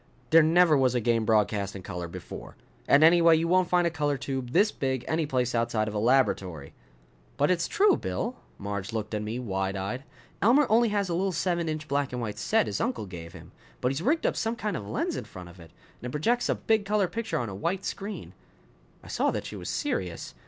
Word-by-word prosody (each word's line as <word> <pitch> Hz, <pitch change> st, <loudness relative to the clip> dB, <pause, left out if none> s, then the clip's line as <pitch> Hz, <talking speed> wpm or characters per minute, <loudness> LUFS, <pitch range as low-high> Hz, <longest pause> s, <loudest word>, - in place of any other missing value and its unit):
"There 165 Hz, -, +8 dB
never 165 Hz, +1 st, +5 dB
was 130 Hz, -3 st, +2 dB
a -, -, +3 dB
game 115 Hz, -1 st, +1 dB
broadcast 105 Hz, -2 st, +1 dB
in 95 Hz, -, -8 dB
color 90 Hz, -3 st, -5 dB
before. 85 Hz, -, -9 dB, 0.3 s
And, 140 Hz, +2 st, +6 dB
anyway, 165 Hz, 0 st, +6 dB
you 165 Hz, +1 st, 0 dB
won't 185 Hz, 0 st, +3 dB
find 175 Hz, -1 st, +3 dB
a 170 Hz, -, +1 dB
color 145 Hz, -3 st, -1 dB
tube 130 Hz, -1 st, -4 dB
this 210 Hz, -, +3 dB
big 130 Hz, -2 st, -2 dB
any 160 Hz, -1 st, 0 dB
place 125 Hz, -3 st, 0 dB
outside 115 Hz, -2 st, 0 dB
of 105 Hz, -, -4 dB
a 105 Hz, -, -1 dB
laboratory." 100 Hz, -, +1 dB, 0.6 s
"But 145 Hz, +5 st, +3 dB
it's 170 Hz, -2 st, +1 dB
true, 410 Hz, +1 st, +4 dB
Bill." 245 Hz, -, -3 dB, 0.2 s
Marge 100 Hz, 0 st, -5 dB
looked 110 Hz, -1 st, -4 dB
at 105 Hz, -, -1 dB
me, 110 Hz, +3 st, -4 dB
wide 95 Hz, -5 st, -2 dB
eyed. 100 Hz, +7 st, -4 dB, 0.4 s
"Elmer 250 Hz, -, +5 dB
only 230 Hz, +1 st, +4 dB
has 205 Hz, -2 st, 0 dB
a 175 Hz, -, -2 dB
little 190 Hz, +3 st, 0 dB
seven 170 Hz, -1 st, -1 dB
inch 155 Hz, 0 st, -4 dB
black 140 Hz, 0 st, 0 dB
and 125 Hz, -, -4 dB
white 110 Hz, -3 st, -4 dB
set 220 Hz, 0 st, +2 dB
his -, -, -3 dB
uncle 235 Hz, -, -2 dB
gave 85 Hz, -3 st, -9 dB
him. 85 Hz, -2 st, -12 dB, 0.3 s
But 125 Hz, -, 0 dB
he's 135 Hz, +3 st, -3 dB
rigged 300 Hz, -, +1 dB
up -, -, +1 dB
some 225 Hz, +1 st, -1 dB
kind 210 Hz, -3 st, -3 dB
of 100 Hz, -, -5 dB
lens -, -, -1 dB
in -, -, -5 dB
front 90 Hz, -1 st, -10 dB
of 85 Hz, +1 st, -15 dB
it, 85 Hz, -1 st, -13 dB, 0.3 s
and 125 Hz, -, -5 dB
it -, -, -7 dB
projects 230 Hz, -, 0 dB
a -, -, +2 dB
big 220 Hz, -2 st, +1 dB
color 205 Hz, -1 st, +1 dB
picture 225 Hz, +3 st, -3 dB
on 120 Hz, -3 st, -2 dB
a -, -, -6 dB
white 175 Hz, -, -2 dB
screen." 195 Hz, -, -6 dB, 0.7 s
I -, -, -13 dB
saw -, -, 0 dB
that -, -, -3 dB
she -, -, -7 dB
was -, -, -6 dB
serious. 90 Hz, -3 st, -3 dB
135 Hz, 230 wpm, -27 LUFS, -, 0.7 s, There